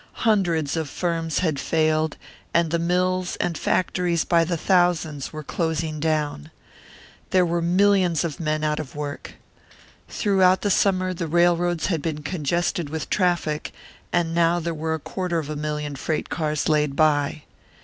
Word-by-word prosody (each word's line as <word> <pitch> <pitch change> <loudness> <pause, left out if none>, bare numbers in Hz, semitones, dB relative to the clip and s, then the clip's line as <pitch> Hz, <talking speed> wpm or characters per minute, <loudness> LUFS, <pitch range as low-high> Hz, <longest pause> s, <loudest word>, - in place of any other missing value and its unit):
Hundreds 170 -9 +2
of 160 -3 -2
firms 165 -1 -2
had 155 -4 0
failed, 155 0 +1 0.4
and 170 -2 +3
the 170 - +1
mills 180 +2 0
and 175 - -2
factories 175 -1 0
by 170 -1 +3
the 170 +1 -1
thousands 170 -6 +1
were 155 -1 -7
closing 160 0 -2
down. 150 - -1 0.8
There 185 -1 +4
were 170 0 0
millions 180 -1 +3
of 165 -4 -4
men 155 -1 -1
out 150 0 0
of 150 -2 -7
work. 145 -1 -6 0.7
Throughout 190 -3 +3
the 205 - +1
summer 185 -1 +2
the 170 -1 -4
railroads 175 +1 +2
had 165 -5 0
been 150 -1 -3
congested 170 0 -1
with 160 0 -5
traffic, 175 -5 0 0.4
and 170 -1 +1
now 170 +1 +3
there 170 0 -3
were 160 +1 -2
a - - -6
quarter 180 +2 -3
of 155 -2 -3
a - - -3
million 150 -1 -3
freight 155 +3 -3
cars 155 -2 -1
laid 150 -2 +1
by. 150 -1 +2
165 Hz, 160 wpm, -23 LUFS, 155-175 Hz, 0.8 s, There